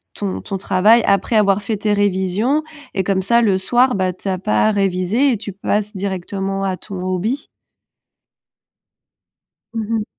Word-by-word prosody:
ton 200 -2 -3
ton 195 - -4
travail 210 +5 +4
après 200 +3 +2
avoir 205 -1 +3
fait 215 +1 -2
tes 210 +1 0
révisions 205 +8 +1 0.3
et 190 - +1
comme 190 0 0
ça 235 +5 +3
le 200 -4 +3
soir, 245 +6 +3
bah, 185 -1 0
tu 185 - -10
as 185 - 0
pas 110 - +2
réviser 200 +6 +1
et 230 - 0
tu 205 - -7
passes 210 +2 -2
directement 195 0 -3
à 190 -1 -1
ton 195 -2 -8
hobby. 210 - -2 2.3
Mmh 225 -1 -2
mh. 215 - -1
200 Hz, 160 wpm, -19 LUFS, 190-215 Hz, 2.3 s, travail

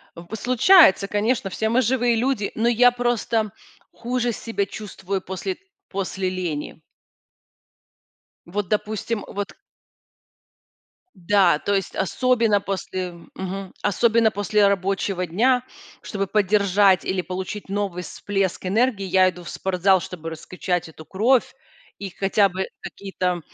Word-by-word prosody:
В 170 - -10
п 220 - -6
случается, 250 - +5
конечно, 210 0 0
все 220 +4 -1
мы 240 +3 +3
живые 245 0 +2
люди, 235 -3 0
но 230 +2 +1
я 245 +1 +5
просто 235 -3 -1 0.4
хуже 245 0 -2
себя 220 -2 -2
чувствую 195 -2 -5
после 190 - -4 0.3
после 195 -1 -2
лени. 170 -5 -4 1.7
Вот, 190 +2 -3
допустим, 215 +1 -2
вот 200 0 -5 1.6
да, 180 -3 +3
то 200 - -1
есть 195 -1 -2
особенно 230 +1 +2
после 185 -2 -4 0.2
мгм, 190 0 -5
особенно 225 +2 +3
после 205 0 +2
рабочего 195 -1 0
дня, 250 +9 +2 0.4
чтобы 195 -2 -3
поддержать 200 -1 +3
или 185 -1 -1
получить 185 +4 -6
новый 195 -3 -2
всплеск 195 +1 -2
энергии, 215 +1 +1
я 185 0 +4
иду 180 -1 -12
в 170 - -9
спортзал, 190 0 +2
чтобы 165 -2 -7
раскачать 175 +2 -3
эту 160 0 -12
кровь 230 +9 +2 0.4
и 195 -1 -6
хотя 195 +2 +2
бы 190 +1 -3
какие-то 185 -3 -3
200 Hz, 125 wpm, -23 LUFS, 185-220 Hz, 1.7 s, случается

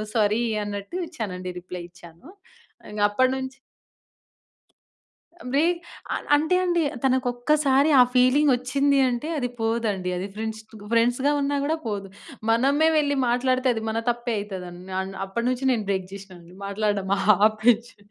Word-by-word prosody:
Sorry. 215 +1 +2 0.2
అన్నట్టు 205 - -5
ఇచ్చానండి, 185 - -5
reply 180 -1 -8
ఇచ్చాను. 170 - -15 0.6
ఇంగప్పటి 210 +5 +2
నుంచి 265 0 -6 2.0
బ్రే 280 +3 +3 0.5
అల - - -4
అంటే 315 +5 +2
అండి, 345 -2 +1 0.2
తనకొక్కసారి 265 +3 +2
ఆ - - +10
ఫీలింగొచ్చింది 270 +1 +3
అంటే, 245 +5 -3
అది 245 -3 -1
పోదండి. 225 -5 -1
అది 185 +2 -3
ఫ్రెండ్స్‌ 220 0 -5
తుగు 215 -2 -12
ఫ్రెండ్స్‌‌గా 245 +5 +2
ఉన్నా 285 +1 0
గూడా 315 +3 0
పోదు. 200 -3 -3 0.4
మనమే 275 +7 +3
వెళ్లి 285 -1 +1
మాట్లాడితే, 255 +1 +1
అది 225 - -4
మన 225 - -1
తప్పే 240 -1 -2
అయితదండి. 185 -2 -8
అన్ 190 0 -5
అప్పడినుంచి, 245 +6 -1
నేను 220 -4 -1
బ్రేక్ 190 -1 -1
జేషినా 195 -2 -10
అండి. 170 +2 -16
మాట్లాడడం 200 -1 -1 0.4
ఆపేచ్చి 225 +2 +1
235 Hz, 130 wpm, -24 LUFS, 200-265 Hz, 2.0 s, ఆ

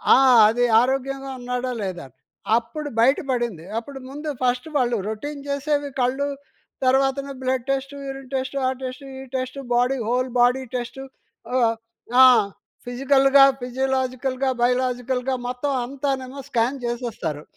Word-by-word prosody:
ఆ! - - +6 0.3
అది 245 +2 +2 0.2
ఆరోగ్యంగా 270 +1 -2
ఉన్నాడా 250 +1 -3
లేదా? 180 -5 -5 0.5
అప్పుడు 290 +6 -5
బయట 260 +4 +5
పడింది. 235 -10 -2
అప్పుడు 270 +4 -6
ముందు 295 +3 -6
ఫస్ట్ 250 +3 +1
వాళ్ళు 245 -2 +1
రోటీన్ 280 +7 -5
చేసేవి 285 +1 -1
కళ్ళు 265 +3 +1 0.6
తర్వాతన 270 +1 +2
బ్లడ్ 255 -1 -1
టెస్ట్, 275 +1 -2
యూరిన్ 270 -1 -7
టెస్ట్, 265 +1 -3
ఆ - - +3
టెస్ట్, 260 +2 -6
ఈ 265 - -7
test, 260 +1 -3
body 250 +3 +2
whole 250 +2 0
body 250 +2 +3
test 245 +2 -4 0.6
ఆహ్, 230 -2 +3 0.5
ఆ! - - +11 0.6
ఫిజికల్‌గా, 275 +2 +5 0.2
ఫిజియోలాజికల్‌గా, 260 +1 -1
బయోలాజికల్‌గా 250 +1 0
మొత్తం 250 +3 -2
అంతానేమో 270 0 -3
స్కాన్ 245 +3 +1
చేసేస్తారు. 230 - -4
255 Hz, 125 wpm, -23 LUFS, 245-270 Hz, 0.6 s, ఆ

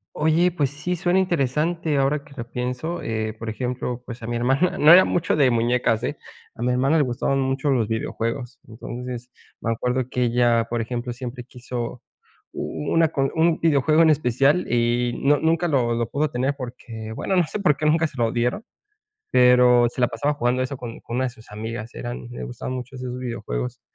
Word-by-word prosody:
Oye, 160 +4 +3
pues 145 -6 0
sí, 175 +5 -3
suena 175 +2 +2
interesante 160 -1 0
ahora 140 +2 +1
que 145 - -16
lo 120 - -4
pienso, 125 +7 -3
eh, 110 -1 -2
por 115 -1 -5
ejemplo, 125 +1 -3
pues, 120 0 -8
a 115 - -6
mi 120 - -2
hermana, 135 +10 +1
no 155 0 +7
era 185 +2 +9
mucho 170 -2 0
de 135 -3 +5
muñecas, 120 -1 +1
eh, 140 +4 -2 0.4
a 115 - -11
mi 125 - +1
hermana 135 +6 +2
le 150 - +4
gustaban 130 +2 0
mucho 135 +2 0
los 120 -6 +2
videojuegos. 115 +3 -3
Entonces 125 +2 -7 0.3
me 115 - -1
acuerdo 125 +2 -1
que 125 -1 0
ella, 120 -1 +3
por 120 -1 -1
ejemplo, 120 +1 -4
siempre 125 0 -7
quiso 125 -1 -6 0.5
u - - -6
u 75 -2 -4
u - - +1
una 165 0 +4
con 135 -2 -1
un 165 0 +2
videojuego 155 0 +3
en 165 - +6
especial, 140 +3 +2
y 120 0 +1
no, 145 +1 +4
nunca 165 +2 +1
lo 125 -5 +2
lo 115 -1 -1
pudo 150 +1 0
tener, 130 +3 -1
porque 115 -4 -7
bueno, 190 +8 -1
no 175 - +4
sé, - - -4
por 150 -7 +3
qué, 155 - -2
nunca 160 +2 +3
se 135 - -15
lo 115 -1 +1
dieron, 125 - -1 0.7
pero, 125 -1 +6
se 120 - -7
la 125 - +5
pasaba 145 +1 -1
jugando 125 -1 0
eso 135 +2 -3
con 120 -2 -8
con 115 - -6
una 130 - +1
de 125 - -1
sus 115 -1 -17
amigas, 110 +2 -6
eran 120 0 -6
le 120 - -6
gustaban 125 +1 -5
mucho 125 +1 -7
esos 125 -1 -5
videojuegos 60 - -4
125 Hz, 210 wpm, -23 LUFS, 120-145 Hz, 0.7 s, era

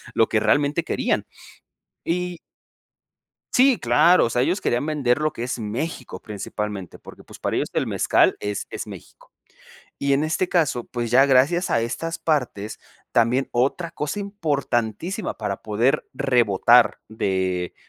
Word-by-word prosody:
lo 115 - +4
que 110 - +1
realmente 145 +7 +2
querían. - - -1 0.8
Y 180 0 -2 1.2
Sí, 260 -1 +5
claro, 165 +10 +4
o - - -1
sea, 120 - +1
ellos 175 +9 +1
querían 120 +4 0
vender 145 -5 +1
lo 155 0 0
que 115 - -6
es 125 0 -3
México 125 +6 -5
principalmente, 105 -2 -6
porque, - - -13
pues, - - -14
para - - -2
ellos - - -1
el - - 0
mezcal - - +3
es 105 0 -4
es - - -5
México. - - -13 0.7
Y 140 0 0
en 140 +3 +1
este 165 +3 0
caso, 150 -10 +1
pues, 120 -2 -4
ya 135 +3 +6
gracias 140 +7 +3
a - - +2
estas 165 +8 -3
partes 125 -9 -2 0.3
también 120 +4 +2
otra 140 +8 0
cosa 150 +5 -4
importantísima 160 - -2
para 105 -3 -4
poder 110 +5 +1
rebotar 120 -3 +3
de 95 -4 -2
125 Hz, 150 wpm, -23 LUFS, 110-160 Hz, 1.2 s, ya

